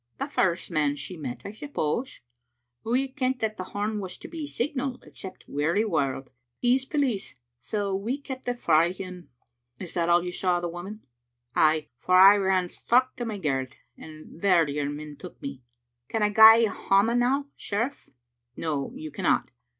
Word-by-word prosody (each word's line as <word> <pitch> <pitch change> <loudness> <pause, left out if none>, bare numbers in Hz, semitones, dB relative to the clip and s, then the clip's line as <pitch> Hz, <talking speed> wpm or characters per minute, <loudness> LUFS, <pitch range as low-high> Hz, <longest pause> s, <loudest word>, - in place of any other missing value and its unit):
" 115 - -47
The - - -1
first 180 -1 0
man 150 -3 +1
she 180 +5 -7
met, 125 -6 -6
I 200 - -5
suppose. 235 - -3 0.6
We 245 +4 +1
a' - - -4
kent 260 -1 -1
that 215 -1 -1
the 185 - -5
horn 210 +2 -3
was 185 -2 -6
to - - -10
be 330 - -8
the - - -8
signal 265 -1 -2
except 190 - -11
Wearywarld. 145 - 0 0.3
He's 255 +2 +2
police, 265 - -1 0.2
so 200 - -2
we 225 +8 -2
kept 265 -2 -8
it 245 0 -1
frae 170 -3 +3
him." 185 -2 -9 0.5
"That - - -8
is 170 - -11
all 170 0 +3
you 180 - -3
saw 180 0 +1
of 175 - -2
the 175 - -1
woman?" 190 +6 -8 0.3
" 120 0 -43
Ay, 155 -1 +3
for 185 - +2
I 195 +2 +9
ran 190 -2 +1
straucht 255 +6 +1
to 240 - -3
my 220 -2 -4
garret, 135 -7 -2 0.2
and 155 +1 -12
there 180 -5 +4
your 145 0 -2
men 150 0 -7
took - - -11
me. 140 -2 -7 0.5
Can 220 -1 0
I 210 - +3
gae 220 +2 +8
hame 210 +4 +2
now, 275 +4 +1
sheriff?" 230 +7 -3 0.2
" 120 0 -53
No, 145 -4 -3
you 155 -1 -7
cannot. 145 - 0
190 Hz, 190 wpm, -26 LUFS, 155-235 Hz, 0.6 s, I